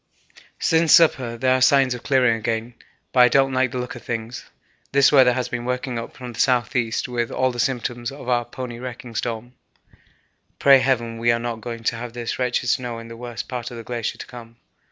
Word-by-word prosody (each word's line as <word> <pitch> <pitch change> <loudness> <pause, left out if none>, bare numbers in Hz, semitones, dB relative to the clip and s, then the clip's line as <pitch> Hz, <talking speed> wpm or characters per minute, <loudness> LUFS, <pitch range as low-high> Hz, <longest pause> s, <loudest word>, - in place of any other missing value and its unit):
Since 160 -1 +3
supper 130 -8 +4
there 130 +2 +2
are 130 - 0
signs 135 -1 +4
of 120 - -7
clearing 125 -4 +3
again, 115 +1 -3 0.4
but 130 - +2
I 125 - +9
don't 135 +2 +3
like 130 0 +2
the 125 - -5
look 125 0 -4
of 120 - -10
things; 115 +1 -5 0.4
this 140 0 +5
weather 130 -4 +6
has 125 0 -2
been 120 -1 -4
working 125 -1 -3
up 115 - -9
from 125 -2 -8
the - - -10
S.E. 125 -2 +1 0.2
with 120 -1 -1
all 130 0 +1
the 120 - -7
symptoms 120 -1 -2
of 140 -2 -10
our 120 -1 +2
pony 120 -1 -7
wrecking 125 -1 -8
storm. 115 +2 -4 1.0
Pray 135 -1 +6
heaven 120 -3 0
we 120 +1 +3
are 115 - +2
not 115 -1 -4
going 115 0 -6
to 115 - 0
have 120 0 -7
this 120 0 -4
wretched 125 -1 0
snow 120 -2 -1
in 115 0 -9
the 115 - -8
worst 120 -1 -7
part 125 -2 -5
of 120 - -9
the 115 - -7
glacier 120 -1 -4
to - - -8
come. 115 -2 -12
120 Hz, 215 wpm, -22 LUFS, 115-130 Hz, 1.0 s, I